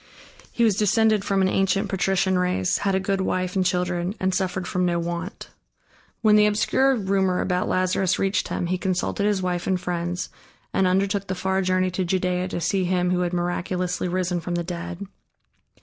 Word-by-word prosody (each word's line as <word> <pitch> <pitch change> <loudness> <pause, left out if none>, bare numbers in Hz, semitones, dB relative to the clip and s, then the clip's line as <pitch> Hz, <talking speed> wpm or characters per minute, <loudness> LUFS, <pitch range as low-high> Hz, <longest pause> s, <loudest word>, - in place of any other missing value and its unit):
He 235 - 0
was 215 -4 +3
descended 215 0 +3
from 195 -1 +1
an - - +3
ancient 195 +2 +1
patrician 190 0 +1
race, 180 0 +1
had 195 -1 0
a - - +2
good 195 0 -1
wife 185 0 -1
and 190 - +2
children, 180 +1 -1
and 190 0 0
suffered 185 -1 -1
from 180 - -1
no 175 -1 +1
want. 170 +2 -5 0.7
When 215 -1 +6
the 210 0 +6
obscure 260 +6 +2
rumor 190 -3 +1
about 180 -1 0
Lazarus 185 0 +1
reached 195 0 0
him, - - -2
he 180 +1 -1
consulted 185 +2 -1
his 200 -3 0
wife 180 -1 -2
and 185 -1 +1
friends 175 0 -3 0.4
and 190 - +3
undertook 195 +1 +1
the 185 - -2
far 190 +1 0
journey 185 0 +1
to 185 +1 -1
Judea 180 0 0
to 185 - -4
see 185 +3 0
him 180 0 +1
who 180 - +1
had 175 -1 0
miraculously 180 +1 -2
risen 180 0 -1
from 175 +1 -3
the 175 - -1
dead. 175 +2 -6
185 Hz, 190 wpm, -24 LUFS, 180-195 Hz, 0.7 s, When